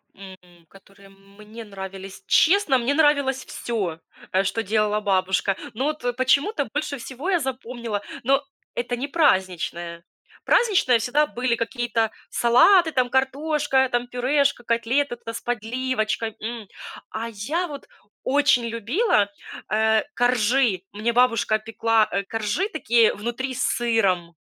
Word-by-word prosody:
М, 180 -3 -14
которые 195 +1 -19
мне 200 +3 -13
нравились? 195 -1 -9
Честно, 340 -6 +4
мне 250 +3 0
нравилось 285 -4 +2
всё, 195 -9 -4 0.3
э, 190 +1 +2
что 215 +3 -1
делала 210 0 +1
бабушка. 190 -2 +1 0.2
Но 260 +5 -2
вот 260 -5 -2
почему-то 280 +6 +2
больше 290 -1 -2
всего 265 +7 -6
я 360 -3 +3
запомнила 240 -5 -4 0.2
но 275 +3 +2 0.3
это 245 0 -2
не 260 +4 -4
праздничное. 180 - 0 0.4
Праздничное 380 - +3
всегда 285 +7 +1
были 245 -3 -1
какие-то 230 -1 -1 0.2
салаты, 320 +9 +5
там 255 -4 +1
картошка, 270 +1 +1
там 245 0 -1
пюрешка, 260 +2 +1
котлеты 240 +4 0
там 230 - -8
с - - -6
подливочкой, 230 -1 -2
м. 225 -1 -5 0.4
А 225 +1 -4
я 280 - -2
вот 285 -4 -9 0.4
очень 275 -3 +3
любила, 230 - +1 0.4
э, 220 0 +2
коржи. 240 -4 +2
Мне 220 +3 -1
бабушка 230 -3 +2
пекла, 225 0 +1
э, 200 - -1
коржи 225 - -2
такие 235 - +3
внутри 240 +5 -4
с 260 - -2
сыром. 195 -8 0
235 Hz, 130 wpm, -23 LUFS, 210-270 Hz, 0.4 s, салаты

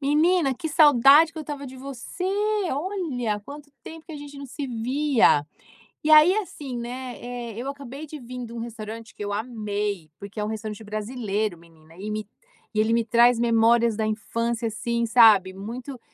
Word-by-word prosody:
Menina, 300 +1 +3
que 320 +5 -5
saudade 295 0 +6
que 325 - -9
eu 310 - -4
estava 285 -2 -6
de 260 0 -10
você! 275 +6 -7 0.5
Olha, 280 - -2
quanto 285 +6 -11
tempo 325 0 -11
que 325 - -9
a - - -6
gente 290 -1 -10
não 280 - -7
se 275 +2 -5
via! 250 - +2 0.6
E 305 - 0
aí, 310 +4 +8
assim, 295 - -4
né, 245 +1 -6
eh, 240 -1 -6
eu 250 +4 -4
acabei 280 +1 -8
de 305 +1 -8
vim 250 0 -7
de 230 - -10
um 235 - -6
restaurante 230 0 -7
que - - -7
eu 205 0 -3
amei, 210 -5 -3
porque 200 +2 -8
é - - 0
um - - -3
restaurante 215 0 -5
brasileiro, 215 -2 -3
menina 165 -1 -20
e 205 +3 -6
me 215 -1 -4 0.5
e 215 - 0
ele 220 +1 +3
me 230 0 +2
traz 235 +1 +4
memórias 230 0 +3
da 220 - 0
infância, 230 +2 -2
assim, 235 +1 -2
sabe, 220 -5 +6
muito 240 +7 -7
235 Hz, 185 wpm, -25 LUFS, 215-280 Hz, 0.6 s, aí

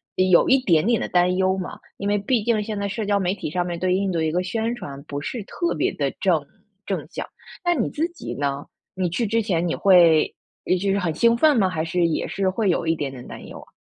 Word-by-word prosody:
一 185 0 +2
有 175 - +5
一 265 - +6
点 165 -8 +3
点 230 -1 +2
的 - - -3
担 180 0 +3
忧 190 0 +1
嘛， 185 - -5 0.2
因 200 - -4
为 205 0 +2
毕 215 +3 0
竟 220 -2 +1
现 210 -1 -4
在 200 - -1
社 210 +2 -3
交 200 0 +2
媒 185 -1 0
体 195 - -5
上 180 +1 -1
面 175 -1 -4
对 185 +1 0
印 195 +1 0
度 170 -2 -1
一 160 -1 0
个 175 +3 0
宣 225 +5 -2
传 140 -11 -8
不 145 -1 -5
是 215 - -5
特 340 - -2
别 - - +1
得 - - -1
正 - - +2 0.4
正 - - -3
向， - - -6 0.4
那 350 - +4
你 255 -10 0
自 320 +3 -1
己 340 - -7
呢？ 140 0 -2 0.3
你 185 -2 -1
去 205 +8 -1
之 225 +2 +1
前 180 -6 0
你 165 - -1
会 170 -5 +5 0.5
就 200 0 +1
是 200 - +1
很 170 -4 -1
兴 235 +7 +3
奋 295 +2 +4
吗？ 195 -4 +3
还 160 -3 -2
是 170 +1 +1
也 160 - -1
是 195 -1 0
会 200 +1 0
有 170 -1 0
一 165 - +2
点 145 -3 -3
点 125 -2 -10
担 - - -9
忧 - - -10
啊？ - - -16
185 Hz, 280 characters per minute, -23 LUFS, 170-215 Hz, 0.5 s, 一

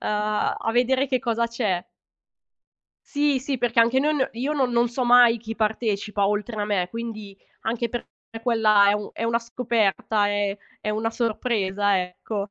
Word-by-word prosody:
a 210 +1 -1
vedere 260 +3 +2
che 260 -1 0
cosa 235 -1 0
c'è. 215 -7 -1 1.3
Sì, 290 -2 +1
sì, 270 0 -3
perché 235 -1 +2
anche 235 +3 +4
noi 300 +3 +2
n 275 -3 0
io 255 +6 -2
non 270 -4 +1
non 240 0 +2
so 245 +2 -2
mai 240 -1 +6
chi 225 0 -7
partecipa 210 -2 0
oltre 210 +2 -2
a - - 0
me, 195 -4 0
quindi 215 -3 -7 0.3
anche 235 +1 -1
per 240 +1 -5 0.4
quella 215 -4 +4
è - - +3
u 210 0 -4
è 230 - -4
una 230 0 +1
scoperta, 225 -3 0
è 205 -1 -1 0.2
è 215 - -2
una 220 +2 -1
sorpresa, 205 -4 0
ecco. 200 +3 -5
225 Hz, 170 wpm, -24 LUFS, 210-240 Hz, 1.3 s, mai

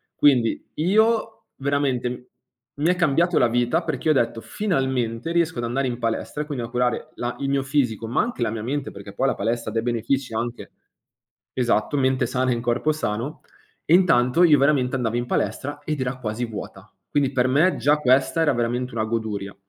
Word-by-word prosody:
Quindi 125 -6 +2
io 220 +6 +1
veramente 130 -3 -1 0.5
mi 150 +4 +1
è 180 - +3
cambiato 170 +1 +2
la 120 - +4
vita, 120 +8 +1
perché 155 -1 -2
ho - - +5
detto: 115 -3 0
"Finalmente 130 - -1
riesco 170 -3 +1
ad 120 - -2
andare 130 +3 -1
in 120 - -3
palestra 115 +5 -2
e - - -11
quindi 140 -6 -4
a - - -4
curare 125 0 -1
la 120 0 -3
il 135 0 -2
mio 140 -1 +1
fisico, 125 -6 0
ma 115 - +1
anche 230 - -2
la 110 - 0
mia 110 - -4
mente." 135 +5 -3
Perché 100 0 -10
poi 135 +6 0
la - - +1
palestra, 115 +2 -2
ha - - -10
dei 115 - +1
benefici 120 +2 -1
anche 120 +1 -4 0.8
esatto, 120 +2 +1
mente 130 -2 +2
sana 130 +1 0
in 120 - -3
corpo 120 +6 +1
sano, 120 0 -3 0.4
e 160 - +3
intanto, 165 -4 +4
io 155 -4 +6
veramente 135 -2 +2
andavo 115 -2 -1
in 120 - -1
palestra 145 +1 -2
ed 150 -3 -3
era 130 0 -2
quasi 110 +1 -3
vuota. 110 -3 -9 0.2
Quindi 140 -2 +1
per 125 -1 +2
me, 150 +8 +3
già 145 +2 +3
questa 135 +3 +2
era 155 - +3
veramente 120 +1 -2
una 110 -1 -1
goduria. 105 -3 -3
130 Hz, 195 wpm, -23 LUFS, 120-145 Hz, 0.8 s, io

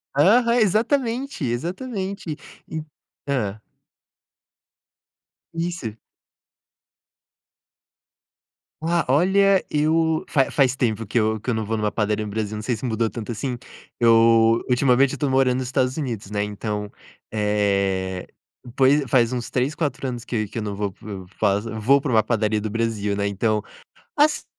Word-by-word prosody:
Aham, 235 - +5
exatamente, 235 - 0
exatamente 185 - -3 0.3
e 160 -1 -5 0.4
hã. 110 -7 -1 1.9
Isso. 165 -10 -3 2.9
Ah, 170 +1 +1
olha, 190 +6 +4
eu 160 +1 +1
fa 135 -4 +2
faz 135 -3 +3
tempo 115 -4 -1
que 115 - 0
eu 110 0 +1
que 125 - -4
eu - - +2
não 110 -1 -2
vou 115 +2 -1
numa 105 -1 -1
padaria 105 0 -1
no - - -6
Brasil, 110 0 -3
não 105 - -4
sei 120 0 -1
se 130 - -6
mudou 115 -1 0
tanto 115 -1 -7
assim, 125 +2 -3 0.4
eu 115 0 +5
ultimamente 130 +1 +4
eu - - -3
estou 145 0 0
morando 130 -1 +3
nos 130 -1 -3
Estados 130 +1 0
Unidos, 115 -8 -4
né, 105 0 0
então, 105 0 -4 0.4
eh, 100 -3 0 0.5
poi 135 +2 +4
faz 125 -1 +2
uns 120 -1 -3
3, 135 +4 -1
4 145 -4 -2
anos 120 -2 -5
que 110 -4 -2
que 115 - -5
eu - - -3
não 100 -1 -4
vou 100 -2 -2
para 105 - -13
o 95 -1 -10
faz 100 +3 0
vou 115 +5 +2
para 140 - -4
uma 110 -2 +4
padaria 110 -2 0
do 110 - -3
Brasil, 105 -2 -1
né, 100 0 0
então, 105 +1 0 0.6
assi 300 +1 +3
120 Hz, 150 wpm, -23 LUFS, 105-150 Hz, 2.9 s, Aham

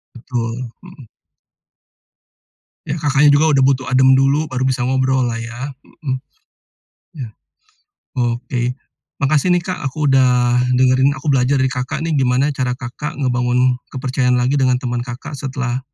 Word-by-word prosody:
Betul. 120 0 -4
Hmm. 175 -9 -14 1.8
Ya, - - -2
Kakaknya 145 0 +4
juga 145 +2 +4
udah 135 - +4
butuh 135 -1 +1
adem 130 +1 +5
dulu, 135 +3 +3
baru 130 -4 -4
bisa 130 -2 0
ngobrol 130 0 +1
lah 115 -1 -3
ya? 120 +4 -6 0.3
Heeh. 130 -2 0 1.0
Iya. 130 -7 -7 1.1
Oke, 120 0 -4 0.5
makasih 150 +4 +1
nih 175 - -2
Kak, 185 0 -4
aku 150 +3 -4
udah 125 -2 +3 0.2
dengerin, 130 +2 +3
aku 140 +2 -1
belajar 135 +1 +2
dari 130 -1 +1
Kakak 130 +4 -3
nih, 165 - -1
gimana 135 +1 +2
cara 125 -2 -2
Kakak 130 +4 -6
ngebangun 125 -1 +1
kepercayaan 125 -1 0
lagi 130 +3 +1
dengan 130 -1 +3
teman 125 -1 -3
Kakak 125 +3 -7
setelah, 130 -2 -3
130 Hz, 145 wpm, -18 LUFS, 125-140 Hz, 1.8 s, adem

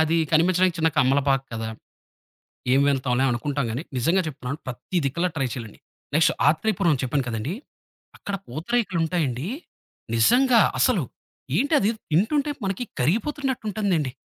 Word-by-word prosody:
అది 160 +1 +2 0.2
కనిపించడానికి 180 +2 +3
చిన్న 160 - +3
కమ్మలపాక 135 +1 +3
కదా! 110 0 -3 1.1
ఏం 135 - +4
వెళ్తాంలే 130 -1 +1
అనుకుంటాం 140 +2 -1
గానీ, 130 +8 -3
నిజంగా 170 +10 +2
చెప్తున్నాను 135 -1 -5
ప్రతి 130 +8 -4
దిక్కలా 170 +7 0
ట్రై 135 -4 0
చేయలండి. 115 -4 -8 0.4
నెక్స్ట్ 160 0 +4
ఆత్రేయపురం 165 -2 +2
చెప్పాను 135 +1 0
కదండీ! 115 +8 -3 0.6
అక్కడ 200 - -4
పూతరేకులుంటాయండి, 165 - -1 0.7
నిజంగా 245 - +5 0.2
అసలు - - +3 0.5
ఏంటది 280 -7 +3 0.2
తింటుంటే 280 - +2
మనకి 195 +5 -2 0.2
కరిగిపోతున్నటుంటుందండి. 210 - 0
160 Hz, 115 wpm, -24 LUFS, 135-195 Hz, 1.1 s, నిజంగా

